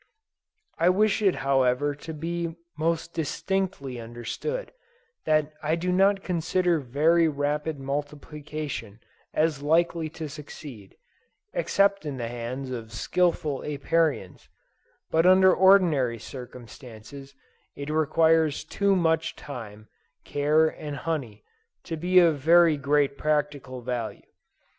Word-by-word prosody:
I 170 +2 +4
wish 210 +3 +2
it 195 -3 +3
however 135 +1 +2
to 145 +3 -9
be 165 +1 -4 0.2
most 165 +1 -1
distinctly 165 -4 -2
understood, 120 - -5 0.5
that 155 -1 +1
I 155 +1 +1
do 180 +2 -2
not 195 +1 +3
consider 175 0 +1
very 155 +6 +3
rapid 150 +1 -2
multiplication 145 -4 -5 0.3
as 155 -3 0
likely 165 +1 +1
to 160 - -4
succeed, 145 -7 -11 0.6
except 200 -1 +2
in 145 -3 -5
the 120 -2 -4
hands 125 +3 -5
of 115 -3 -6
skillful 155 +2 0
Apiarians; 150 - -1 0.6
and 165 +1 +3
under 185 0 +6
ordinary 170 -11 +4
circumstances 125 +2 -11 0.4
it 145 +1 -5
requires 160 0 +2
too 200 -1 +1
much 160 -2 +1
time, 110 -6 -9 0.4
care 150 +2 +2
and 150 -2 -6
honey, 140 -10 -4 0.4
to 165 - -4
be 180 +3 +1
of 165 -5 +5
very 165 +2 +5
great 140 0 +1
practical 145 -4 -1
value. 120 -2 -4
150 Hz, 115 wpm, -26 LUFS, 135-165 Hz, 0.6 s, under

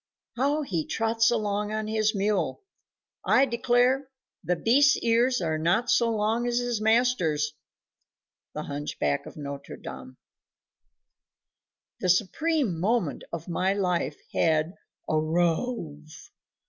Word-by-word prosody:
How 285 +4 +1
he 170 - -3
trots 225 0 +2
along 210 -2 -1
on 215 0 -2
his 215 0 0
mule! 205 - -1 0.6
I 270 - +4
declare 250 +2 +1 0.3
the 180 - 0
beast's 275 - +4
ears 235 +1 +2
are 160 -2 -1
not 175 +9 +1
so 235 -1 +3
long 225 +2 0
as 240 0 0
his 245 -3 -1
master's. 215 -10 +2 1.0
The - - -3
Hunchback 140 - -2
of - - -11
Notre 140 -1 -7
Dame. 130 0 -10 1.8
The 185 - -1
supreme 220 - +1
moment 195 - 0
of 170 -1 -6
my 185 +2 0
life 175 -7 -1 0.2
had 160 +1 +1 0.3
"arrove." 160 0 -2
210 Hz, 115 wpm, -26 LUFS, 160-240 Hz, 1.8 s, I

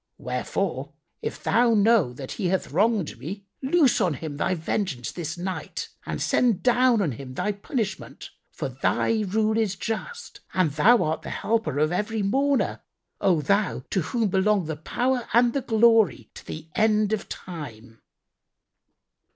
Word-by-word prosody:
Wherefore, 130 +3 -3 0.3
if - - -5
Thou 230 +2 +3
know 210 - +4
that 130 +1 -8
he 195 - -2
hath 190 +1 -1
wronged 205 +1 +1
me, 195 +6 -7 0.2
loose 270 -4 +3
on 175 -7 +1
him 145 +1 -6
Thy 185 - 0
vengeance 160 - -2
this 170 -1 -5
night 185 +1 -5 0.2
and - - -3
send 235 -6 +2
down 245 -3 +4
on 160 - 0
him 130 +2 -8
Thy 210 - 0
punishment; 210 +1 -5 0.2
for - - -4
Thy 225 -1 0
rule 215 +2 +1
is 210 -4 0
just 340 - -5 0.2
and 185 -5 +2
Thou 210 - +5
art 155 +1 -1
the - - -7
Helper 225 - -1
of 155 +2 +2
every 210 +3 -1
mourner, 270 +7 +1 0.4
O 175 -5 +2
Thou 200 -3 +1
to 190 - +1
whom 220 +6 -1
belong 195 0 +2
the 160 0 -3
power 245 - -1
and 240 0 +4
the 275 - 0
glory 220 - +3
to - - -12
the 155 0 -7
end 215 -1 +3
of 215 - -3
time!" 120 -10 -9
200 Hz, 160 wpm, -25 LUFS, 160-225 Hz, 0.4 s, Thou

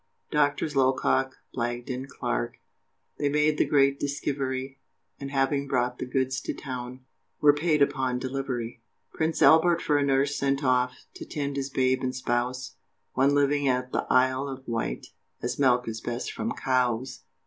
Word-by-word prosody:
Doctors 145 0 +1
Locock, 130 0 +2 0.2
Blagden, 120 +2 -3
Clark, 120 -3 -3 0.6
They 145 - +1
made 150 +1 +2
the - - +3
great 140 -1 +3
diskivery, 135 -2 -3 0.4
And 140 - -5
having 140 +1 0
brought 125 -2 0
the - - -4
goods 130 +1 0
to - - -4
town, 130 -1 -6 0.4
Were 145 -1 +6
"paid 150 -1 +2
upon 130 -3 0
delivery!" 125 -3 -4 0.3
Prince 160 0 0
Albert 165 +1 +6
for 145 -3 +1
a - - +2
nurse 140 +1 +2
sent 140 +1 0
off, 125 -1 +1
To - - -7
tend 140 -2 -3
his 140 -1 -2
babe 130 -1 +1
and 130 0 -2
spouse 125 -3 -2 0.4
One 135 +2 +3
living 145 0 +2
at 125 0 0
the - - -1
Isle 130 +2 +3
of 135 -1 -8
Wight, 115 -1 -2 0.4
As - - -2
milk 125 -3 +3
is 115 0 -4
best 120 +1 -3
from 225 - -3
COWES! 130 -1 0
135 Hz, 160 wpm, -27 LUFS, 125-140 Hz, 0.6 s, Were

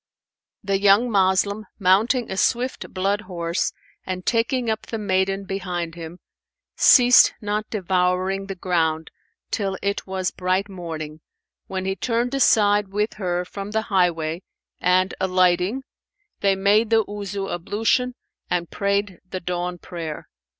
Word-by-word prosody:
The 195 -1 0
young 205 +5 +4
Moslem, 200 +2 +2
mounting 215 +6 +2
a - - -2
swift 245 +6 0
blood 195 +2 0
horse 170 -3 -2 0.3
and 185 -1 -5
taking 235 +1 +1
up 220 -1 -2
the 225 - -4
maiden 195 -1 0
behind 180 -3 -4
him, 165 0 -8 0.6
ceased 250 -1 +7
not 210 -1 -3
devouring 185 0 0
the 195 - -5
ground 165 -3 -1 0.4
till 195 -3 -1
it 200 0 -2
was 190 -1 -2
bright 185 +2 -1
morning, 160 -5 -7 0.5
when 190 -1 -4
he 190 0 -1
turned 240 +3 -1
aside 210 -6 +4
with 210 +3 -1
her 180 -1 -1
from 200 +2 -7
the 220 +1 0
highway 170 -3 +1 0.4
and, 185 +1 +2
alighting, 185 +5 +2 0.6
they 195 -1 +2
made 205 +3 +3
the 225 -2 +3
Wuzu 200 -1 -5
ablution 225 +8 0 0.3
and 175 -1 -1
prayed 200 -2 -1
the 185 - -4
dawn 180 0 -3
prayer. 165 -3 -7
195 Hz, 135 wpm, -23 LUFS, 180-210 Hz, 0.6 s, ceased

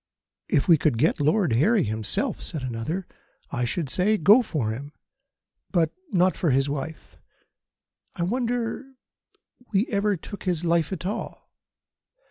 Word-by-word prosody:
"If 140 - +2
we 165 -4 +6
could 150 -7 +1
get 155 +7 +2
Lord 155 - +2
Harry 195 - +3
himself," 110 -1 -2
said 150 -5 -3
another, 130 +10 -3 0.5
"I 125 - -1
should 155 +6 -2
say: 195 +10 +2
Go 210 +8 +6
for 150 - -2
him, 140 +6 -7 0.8
but 170 -4 +2 0.2
not 185 0 +3
for 170 - 0
his 135 +1 +2
wife. 145 +2 -6 1.0
I 170 - -2
wonder 245 +5 -2 0.8
we 205 +1 +2
ever 205 -2 +1
took 200 +5 -9
his 175 -2 0
life 165 -1 +2
at 180 -2 -5
all. 200 - -5
170 Hz, 140 wpm, -25 LUFS, 140-200 Hz, 1.0 s, we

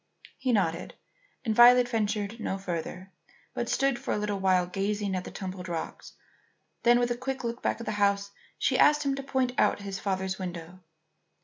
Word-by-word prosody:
He 255 -1 0
nodded, 190 -7 0 0.5
and 220 - +1
Violet 245 +1 +8
ventured 215 -1 -1
no 195 - -2
farther, 185 0 -5 0.4
but - - -3
stood 275 -3 +1
for - - -2
a - - -1
little 205 -1 -2
while 185 -2 +3
gazing 200 +2 -2
at 180 - -3
the - - -6
tumbled 185 -2 -6
rocks. 165 -2 -5 0.7
Then, 240 0 +5
with 245 0 +1
a - - +1
quick 260 +1 -4
look 235 +1 -3
back - - -1
at 230 - -6
the - - -2
house, 200 0 +2 0.3
she - - +1
asked 295 0 +5
him 275 - +2
to 275 - -3
point 265 -2 0
out - - +3
his 195 -1 -5
father's 190 -1 -2
window. 175 -1 -6
205 Hz, 190 wpm, -28 LUFS, 190-240 Hz, 0.7 s, Violet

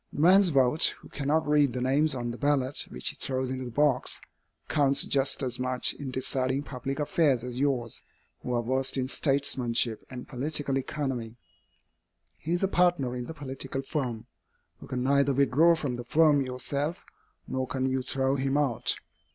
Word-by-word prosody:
The - - -7
man's 185 +4 +6
vote, 135 0 +3
who - - -16
cannot 150 +2 0
read 145 -4 +3
the 125 - -3
names 140 +4 +2
on 120 -1 -3
the 120 - -7
ballot 145 -2 0
which 65 - -1
he - - -6
throws 130 -1 -2
into 130 0 -4
the - - -5
box, 140 +1 +2 0.5
counts 140 -1 +2
just 135 0 0
as 125 -1 -3
much 125 0 +1
in 140 -2 -7
deciding 130 +1 -1
public 135 0 -5
affairs 145 -4 +2
as 125 0 -5
yours, 130 -5 -1 0.4
who 125 - -5
are 120 - 0
versed 130 +3 0
in 130 -1 0
statesmanship 130 -5 0
and 125 -1 -8
political 145 +1 0
economy. 130 -5 -4 1.0
He 165 - -3
is 175 - 0
a - - +4
partner 175 -9 +2
in 125 -1 -4
the 160 - -7
political 135 -1 -4
firm. 125 -7 -3 0.6
You - - -10
can 125 -1 -3
neither 140 0 +3
withdraw 140 +5 +4
from 140 -6 -3
the 120 - -7
firm 150 +1 +4
yourself, 140 +5 -3 0.4
nor 130 0 -2
can 130 0 -1
you 130 0 0
throw 135 +1 0
him 135 +1 0
out. 125 -4 +1
135 Hz, 175 wpm, -28 LUFS, 125-145 Hz, 1.0 s, man's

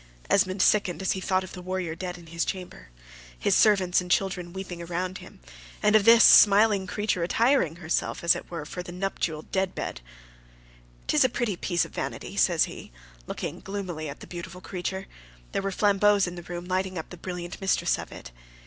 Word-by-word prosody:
Esmond 185 0 +3
sickened 200 -4 +2
as 190 - +1
he 190 - -2
thought 185 0 +1
of 185 - -10
the 180 - -8
warrior 185 -2 -3
dead 180 +1 -6
in 170 - -14
his 170 +1 -2
chamber, 180 - -6 0.5
his - - +1
servants 190 -4 +4
and 180 - -8
children 180 -2 0
weeping 185 -2 -7
around 180 +2 -3
him; - - -14 0.4
and 210 +1 +4
of 210 -2 +5
this 230 0 +8
smiling 205 -1 +6
creature 205 -2 -1
attiring 205 - +2
herself, 170 0 -2
as 170 - +5
it - - -8
were, 165 -4 -5
for 180 - -6
that 175 0 -9
nuptial 175 -4 -3
death 190 -1 -2
bed. - - -5 1.0
"'Tis - - +3
a 260 - +3
pretty 235 -4 -1
piece 175 -1 0
of - - -14
vanity," - - -5
says - - +3
he, - - -7 0.4
looking - - -5
gloomily 185 -6 -5
at 140 - -9
the - - -8
beautiful 180 +1 -8
creature: 190 +1 -5 0.5
there - - -1
were 195 - -2
flambeaux 205 +1 +3
in 175 - -5
the 175 - -8
room 175 0 -7
lighting 185 0 -2
up 160 - -6
the - - -7
brilliant 180 +1 -7
mistress 195 - +1
of - - -8
it. - - -10
185 Hz, 195 wpm, -26 LUFS, 175-195 Hz, 1.0 s, this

